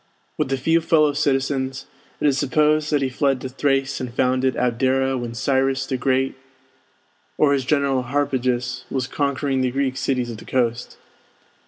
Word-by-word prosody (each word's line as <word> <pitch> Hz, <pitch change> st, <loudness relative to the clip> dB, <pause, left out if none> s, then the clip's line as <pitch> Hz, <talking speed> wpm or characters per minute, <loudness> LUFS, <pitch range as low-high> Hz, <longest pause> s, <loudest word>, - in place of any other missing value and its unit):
With 145 Hz, -3 st, -2 dB
a 135 Hz, -, +1 dB
few 165 Hz, +6 st, +2 dB
fellow 155 Hz, -2 st, +3 dB
citizens, 135 Hz, -2 st, -1 dB, 0.3 s
it -, -, -1 dB
is 140 Hz, -2 st, +4 dB
supposed 150 Hz, +2 st, +2 dB
that 145 Hz, -2 st, +2 dB
he -, -, +1 dB
fled 135 Hz, 0 st, 0 dB
to 130 Hz, -, -5 dB
Thrace 135 Hz, 0 st, 0 dB
and 125 Hz, -2 st, -4 dB
founded 130 Hz, +1 st, +1 dB
Abdera 130 Hz, +2 st, +1 dB
when 120 Hz, -2 st, -4 dB
Cyrus 135 Hz, +1 st, +1 dB
the 135 Hz, -, -2 dB
Great, 130 Hz, +1 st, +1 dB, 1.0 s
or 145 Hz, -2 st, +4 dB
his 135 Hz, -3 st, 0 dB
general 140 Hz, -2 st, +1 dB
Harpagus, 130 Hz, -2 st, -1 dB
was 130 Hz, -2 st, -1 dB
conquering 140 Hz, -1 st, -1 dB
the 130 Hz, -, +1 dB
Greek 130 Hz, 0 st, -1 dB
cities 125 Hz, -3 st, -1 dB
of 115 Hz, -, -7 dB
the -, -, -12 dB
coast. 120 Hz, -2 st, -1 dB
135 Hz, 165 wpm, -22 LUFS, 130-140 Hz, 1.0 s, is